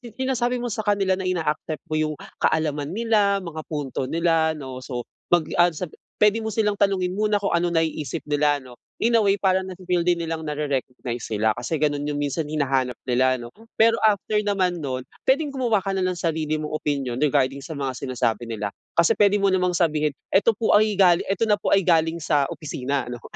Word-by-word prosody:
sinasabi 255 -2 0
mo 240 - -2
sa 215 +1 -4
kanila 195 -2 +2
na 190 - -2
ina-accept 160 -3 -2
mo 155 - +1
yung 155 -1 -1 0.2
kaalaman 150 -2 0
nila, 205 -4 +2
mga 160 -2 -6
punto 140 -4 -3
nila, 165 -1 +1
'no, 130 -4 -7
so, 125 -2 -5 0.2
mag, 175 -2 +3 0.2
ah, 175 - +7
sa 170 0 -5 0.3
pwede 210 +2 +3
mo 220 - -3
silang 210 -1 +1
tanungin 195 -3 +1
muna 210 +1 +1
kung 200 -2 -1
ano 175 +1 +2
naiisip 160 -3 -2
nila 145 0 +2
'no, 125 -1 -12 0.2
in 235 +1 +1
a 230 - +5
way 200 0 +3
parang 190 -1 +1
nafi-feel 180 -1 -1
din 175 0 +2
nilang 165 -1 -3
nare-recognize 135 -5 -3
sila, 110 0 +1
kasi 120 +8 -3
ganun 145 -1 0
yung 145 - -2
minsan 145 +2 -2
hinahanap 135 -4 0
nila 130 +1 +2
'no? 120 0 -10 0.2
Pero 230 +1 +4
after 210 0 +2
naman 185 -5 0
nun, 130 -2 -4 0.2
pwedeng 285 +1 +2
gumawa 245 -5 +1
ka 195 0 -2
na 190 - -1
ng 185 -1 -1
sarili 155 -2 -1
mong 155 0 -5
opinyon 140 -4 -2
regarding 140 -2 +2
sa 155 +2 -7
mga 135 -2 -2
sinasabi 120 -3 -2
nila, 105 -2 -4 0.2
kasi 170 0 +5
pwede 205 0 +4
mo 195 -1 +2
namang 180 -1 +1
sabihin 155 -3 +2 0.2
"Eto 205 +2 +4
po 225 - +2
ay 210 -1 +4
galing, 180 -3 +5
eto 200 +4 +1
na 210 - +3
po 205 - -1
ay 195 -2 +3
galing 165 -1 +3
sa 150 -4 +1
opisina" 140 -3 -3
Ano, 120 0 -7
165 Hz, 200 wpm, -23 LUFS, 145-195 Hz, 0.3 s, ah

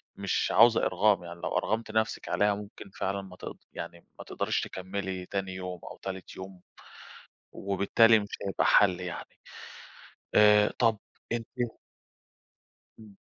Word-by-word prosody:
مش - - -1
عاوزة 115 +1 +6
إرغام، 100 -4 +2
يعني 85 0 -9
لو - - -1
أَرغمتِ 110 0 -1
نفسِك 110 0 -1
عليها 105 0 +2
ممكن 100 -1 -10
فعلًا 100 +1 -3
ما 95 -2 -12
تق - - -8 0.2
يعني 85 +1 -8
ما - - -7
تقدَريش - - -1
تكمّلي 95 0 -5
تاني 95 0 -3
يوم 90 -1 -6
أو - - -11
تالت 95 -1 -6
يوم، 95 -1 -9 0.9
وبالتالي 100 +3 +4
مش 100 - -7 0.2
هيبقى 95 - 0
حَل 95 -3 +5
يعني، 90 -1 -7 1.0
آآ، 105 0 +6
طَب 115 -3 +3 0.3
أنتِ 115 -1 -2 1.5
إمم. 105 -3 -15
100 Hz, 135 wpm, -29 LUFS, 95-105 Hz, 1.5 s, عاوزة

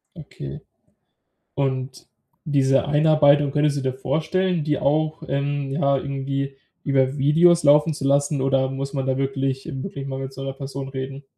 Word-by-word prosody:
Okay. 70 - -9 0.9
Und, 130 -1 -3 0.4
diese 135 -2 +2
Einarbeitung 145 -1 +4
könntest 150 -1 +1
du - - -2
dir 130 -1 -2
vorstellen, 160 +6 -1
die 150 -2 0
auch, 155 +3 0
ähm, 140 0 -2
ja, 140 -1 +2
irgendwie 135 0 -3 0.3
über 135 -1 +1
Videos 165 +5 +4
laufen 150 +2 +5
zu 145 - -6
lassen, 140 0 +2
oder 135 0 +2
muss 135 +1 -4
man 135 -2 -2
da 130 - 0
wirklich, 135 0 -2
eben 135 -1 -5
wirklich 140 -6 -6
mal 135 -1 -4
mit 135 0 -6
so 135 - -7
'ner 135 - -3
Person 135 0 -6
reden? 135 +1 -6
140 Hz, 165 wpm, -22 LUFS, 135-145 Hz, 0.9 s, laufen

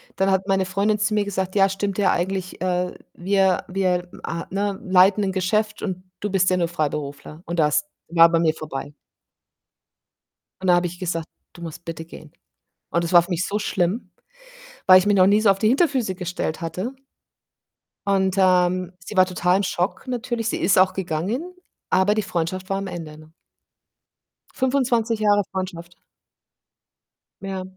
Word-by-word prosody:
dann 195 0 +1
hat 190 +1 0
meine 190 -1 +2
Freundin 200 +3 0
zu 210 +1 0
mir 210 -1 +1
gesagt: 190 -1 -3
„Ja, 195 -1 +5
stimmt 195 0 -3
ja 200 - +3
eigentlich, 185 +1 -2
äh, 180 0 -1 0.2
wir 190 0 +1
wir, 180 -2 -1 0.2
äh, 170 0 -4
ne, 200 0 -2
leiten 190 +2 +4
'n 190 - 0
Geschäft 210 +4 -1
und 185 -2 -4 0.2
du 210 - -2
bist 185 -1 +3
ja 185 - +2
nur 170 -2 +1
Freiberufler.“ 150 -1 -4
Und 170 +1 -3
das 150 -1 +2 0.2
war 170 0 +6
bei 165 - +3
mir 160 -1 +2
vorbei. 145 -2 -7 1.7
Und 190 - -3
da 180 - +6
habe 175 0 +1
ich 175 +1 -10
gesagt: 165 -3 -3 0.3
„Du 175 - -13
musst 165 0 -8
bitte 165 -1 -6
gehen.“ 155 -2 -13 0.6
Und 170 0 0
das 165 - -4
war 175 -1 +8
für 175 - -11
mich 175 0 0
so 205 +1 -1
schlimm, 195 +2 -1 0.8
weil 185 0 +9
ich 185 - 0
mich 205 - +3
noch 185 -1 +6
nie 205 +2 +4
so 215 - +5
auf 195 - +1
die 215 - +2
Hinterfüße 260 - +1
gestellt 180 -3 -4
hatte. 180 +10 -4 1.1
Und, 190 -1 +2
ähm, 185 -1 +3
sie 175 +4 -9
war 185 0 +6
total 180 0 +1
im 200 - -1
Schock 185 +6 -2
natürlich. 240 -2 -2
Sie - - -1
ist 190 - +3
auch 185 0 +5
gegangen, 195 - -3 0.4
aber 190 +3 +3
die 215 - +1
Freundschaft 185 +1 -3
war 195 - 0
am 195 0 -4
Ende, 165 -4 -7
ne? 155 +1 -16 1.2
25 250 -4 +1
Jahre 205 -1 +4
Freundschaft. 180 -2 -6 1.5
Ja. 195 -1 -4
185 Hz, 175 wpm, -22 LUFS, 175-200 Hz, 1.7 s, weil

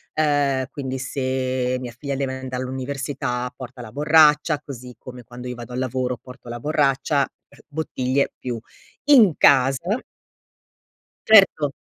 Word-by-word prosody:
uhm, 145 -4 +1
quindi 130 -2 -4
se 130 -1 -2
mia 125 -2 -7
figlia 140 0 -4
deve 130 -1 -3
andar 130 -1 -5
all'università 130 -1 -4
porta 125 -1 -9
la 110 -2 -10
borraccia, 150 0 +4
così 125 -2 -9
come 125 -1 -11
quando 125 +2 -10
io 125 - -4
vado 120 +1 -9
al 125 - -3
lavoro 130 -1 -2
porto 125 -2 -13
la 120 - -5
borraccia 140 0 +1 0.4
bottiglie 140 -3 -1
più 120 -2 -4 0.5
in 240 - +7
casa 140 - +3 1.2
certo. 195 -9 +5
130 Hz, 130 wpm, -22 LUFS, 125-145 Hz, 1.2 s, in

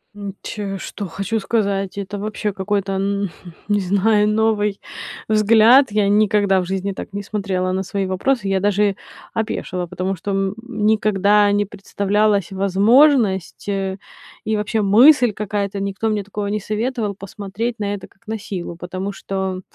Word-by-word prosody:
М, 200 -1 -6
ч 200 -2 -5
что 200 +1 -6
хочу 195 +6 -2
сказать, 200 -3 -1
это 200 0 -4
вообще 210 0 -3
какой-то, 195 0 -2
н 200 0 -1 0.4
не 205 0 +3
знаю, 205 +3 +2
новый 210 -1 +1 0.5
взгляд. 220 +5 +6
Я 205 -1 +2
никогда 205 -2 +3
в 180 - -2
жизни 190 +2 -2
так 195 - -8
не 200 0 -4
смотрела 190 -3 -2
на 190 +1 -1
свои 195 +1 -2
вопросы. 195 +4 0
Я 195 0 +2
даже 205 0 +2 0.4
опешила, 185 -4 -3
потому 185 +2 -3
что, 200 - -4
м, 195 0 -1
никогда 210 -2 +3
не 205 0 +2
представлялась 200 0 0
возможность, 200 - +3
э, 195 -1 -2 0.5
и 220 0 0
вообще 215 +1 -1
мысль 240 +5 +6
какая-то, 200 -1 -3
никто 200 +3 -2
мне 210 -2 -1
такого 205 +1 -4
не 210 +1 -1
советовал- 215 0 -2
посмотреть 205 +4 -5
на 205 -1 -1
это 200 - -7
как 225 +3 -31
на 220 +1 -2
силу, 190 -5 -6
потому 185 +3 -5
что, 190 -1 -4
200 Hz, 155 wpm, -20 LUFS, 195-215 Hz, 0.5 s, взгляд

